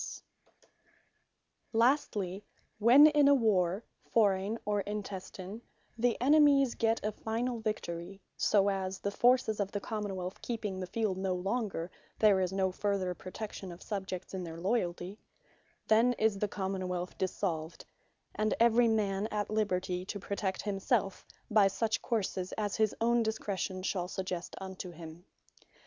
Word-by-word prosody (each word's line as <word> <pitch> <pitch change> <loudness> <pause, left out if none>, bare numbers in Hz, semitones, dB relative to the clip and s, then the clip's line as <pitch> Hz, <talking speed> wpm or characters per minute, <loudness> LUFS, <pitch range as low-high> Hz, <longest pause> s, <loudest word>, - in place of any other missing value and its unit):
Dissolution - - -7 0.2
Of - - -33
The - - -28
Common - - -41 1.0
wealth 240 +3 +7
Lastly, 205 -8 -5 0.3
when 245 +7 +8
in 295 -2 +5
a 285 - +7
warre 200 -5 +2 0.3
(forraign, 205 -1 +2
or 205 -1 +1
intestine,) 200 0 -6 0.3
the 235 0 +1
enemies 280 -1 +5
got 225 0 +1
a 215 - +1
final 230 +3 -2
Victory; 195 -4 -4 0.2
so 200 -1 +3
as 190 -1 -3
(the 200 - -3
forces 240 -1 +3
of 200 -1 -1
the 205 - -2
Common 205 -2 -4
wealth 185 +1 -5
keeping 215 -5 -3
the 185 - -4
field 200 -1 -1
no 190 -1 0
longer) 195 -2 -2 0.3
there 205 -3 +5
is 185 -1 0
no 190 -1 +1
farther 190 -1 -1
protection 190 +1 -7
of 170 - -11
Subjects 190 -3 -5
in 185 -1 -3
their 165 -1 -7
loyalty; 185 -1 -1 0.7
then 230 +3 +5
is 220 -3 +1
the 210 - +1
Common 190 -2 -3
wealth 180 0 -3
DISSOLVED, 170 -4 -2 0.5
and 215 0 0
every 235 +1 +5
man 210 -2 +1
at 210 -1 -3
liberty 185 -4 0
to 200 - -5
protect 195 -1 -3
himselfe 195 0 -1 0.2
by 210 -2 +6
such 220 +3 -1
courses 195 -5 -2
as 205 -2 -2
his 220 -1 +2
own 235 +1 +3
discretion 200 -4 -2
shall 180 -2 -1
suggest 185 -2 -4
unto 190 -1 -7
him. 165 +1 -11
200 Hz, 155 wpm, -31 LUFS, 185-220 Hz, 1.0 s, when